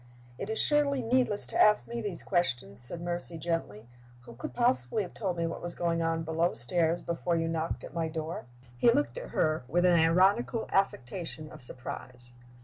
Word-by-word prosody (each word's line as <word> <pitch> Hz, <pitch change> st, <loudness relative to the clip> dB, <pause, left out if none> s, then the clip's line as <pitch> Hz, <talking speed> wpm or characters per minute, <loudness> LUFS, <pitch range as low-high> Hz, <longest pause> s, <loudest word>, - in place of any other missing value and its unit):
"It -, -, -5 dB
is 220 Hz, -, -2 dB
surely 285 Hz, -3 st, +4 dB
needless 235 Hz, -3 st, +1 dB
to -, -, 0 dB
ask 210 Hz, 0 st, +5 dB
me 235 Hz, 0 st, -4 dB
these 200 Hz, -6 st, -5 dB
questions," 120 Hz, -, +1 dB
said 165 Hz, +8 st, -2 dB
Mercy, 175 Hz, -1 st, -3 dB
gently. 155 Hz, -10 st, -4 dB, 0.3 s
"Who 120 Hz, -, -13 dB
could 115 Hz, -, -7 dB
possibly 200 Hz, -, +2 dB
have 180 Hz, -, -10 dB
told 190 Hz, -5 st, -3 dB
me 170 Hz, -, 0 dB
what 165 Hz, -, -5 dB
was 175 Hz, 0 st, -6 dB
going 170 Hz, -1 st, -1 dB
on 165 Hz, 0 st, -1 dB
below 160 Hz, +2 st, 0 dB
stairs 165 Hz, +8 st, 0 dB
before 170 Hz, 0 st, -1 dB
you 165 Hz, 0 st, 0 dB
knocked 165 Hz, 0 st, -3 dB
at -, -, -9 dB
my 165 Hz, -1 st, -1 dB
door?" 160 Hz, -2 st, -5 dB, 0.3 s
He 120 Hz, -, +4 dB
looked 290 Hz, -, +1 dB
at -, -, -9 dB
her 155 Hz, -3 st, 0 dB
with 175 Hz, +7 st, +1 dB
an 180 Hz, -, +5 dB
ironical 190 Hz, +8 st, +2 dB
affectation 165 Hz, -3 st, -2 dB
of 155 Hz, -, -10 dB
surprise. 125 Hz, -1 st, -2 dB
170 Hz, 190 wpm, -29 LUFS, 155-195 Hz, 0.3 s, ask